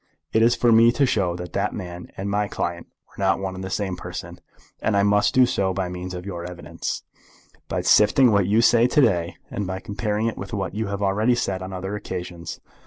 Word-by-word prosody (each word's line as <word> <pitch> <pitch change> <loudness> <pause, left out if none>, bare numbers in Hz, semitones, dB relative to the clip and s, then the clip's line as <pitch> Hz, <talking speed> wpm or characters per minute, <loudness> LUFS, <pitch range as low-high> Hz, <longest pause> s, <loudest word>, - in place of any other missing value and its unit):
It 110 - +4
is 115 +1 +5
for 120 - +3
me 115 +1 +7
to 140 - +3
show 95 -8 0
that 90 -1 -7
that - - 0
man 90 0 -7
and 95 - -4
my 105 +1 0
client 85 -3 -4 0.2
were - - -10
not 95 0 +3
one 95 -1 -4
and 95 0 -7
the 95 - -4
same 95 0 -2
person, - - -7 0.4
and 105 -3 +1
I 100 - +4
must 105 0 +3
do 130 -1 +7
so 95 -6 0
by 95 -2 -1
means 90 0 -6
of 90 +1 -7
your 90 -4 -5
evidence, 90 0 -5 0.6
by - - -2
sifting 115 +4 +5
what 100 -3 +3
you 110 +3 +3
say 120 +1 +5
to 150 - +2
day, 90 -8 +1 0.2
and 105 -6 -3
by 95 0 -3
comparing 105 +2 -2
it 115 - -2
with - - -7
what 95 -3 -3
you 110 +1 -2
have 100 0 -3
already 105 +5 +2
said 95 -5 -2
on 95 +1 -6
other 95 +2 -4
occasions. 90 -4 -6
100 Hz, 230 wpm, -23 LUFS, 90-110 Hz, 0.6 s, me